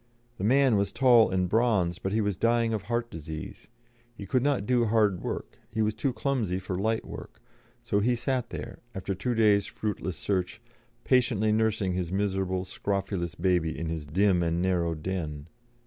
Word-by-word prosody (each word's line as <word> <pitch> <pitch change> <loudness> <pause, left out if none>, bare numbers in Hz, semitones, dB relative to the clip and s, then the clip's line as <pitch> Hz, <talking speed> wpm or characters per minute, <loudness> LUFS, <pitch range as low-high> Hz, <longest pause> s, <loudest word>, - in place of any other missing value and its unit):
The - - -3
man 130 0 +4
was 100 -1 0
tall 120 -3 +5
and 90 -1 +1
bronzed, 100 -5 +1
but 95 - -2
he 110 +2 +1
was 100 -2 0
dying 115 +2 +2
of 110 - -1
heart 120 0 -1
disease; 80 -1 -8 0.5
he 100 - -7
could 125 +6 +1
not 135 -6 +1
do 120 0 +2
hard 105 -4 +2
work, - - -5
and - - -29
he 110 - +2
was 105 0 +1
too 120 +5 -1
clumsy 120 -8 -1
for 95 0 -4
light 110 +4 0
work; - - -9 0.4
so 110 -3 +1
he 120 +4 +2
sat 125 0 -1
there, - - -7 0.2
after 95 +1 -3
two 110 +6 -2
days' 105 -2 +4
fruitless 105 -4 -4
search, 95 +1 -2 0.4
patiently 115 -4 +2
nursing 110 -3 +1
his 90 -1 -2
miserable, 95 -1 -1
scrofulous 95 -3 -3
baby 85 -2 +1
in 80 0 -3
his 80 -3 -4
dim 95 +3 +3
and 85 0 0
narrow 85 -2 +1
den. 80 -3 -4
100 Hz, 180 wpm, -28 LUFS, 90-115 Hz, 0.5 s, tall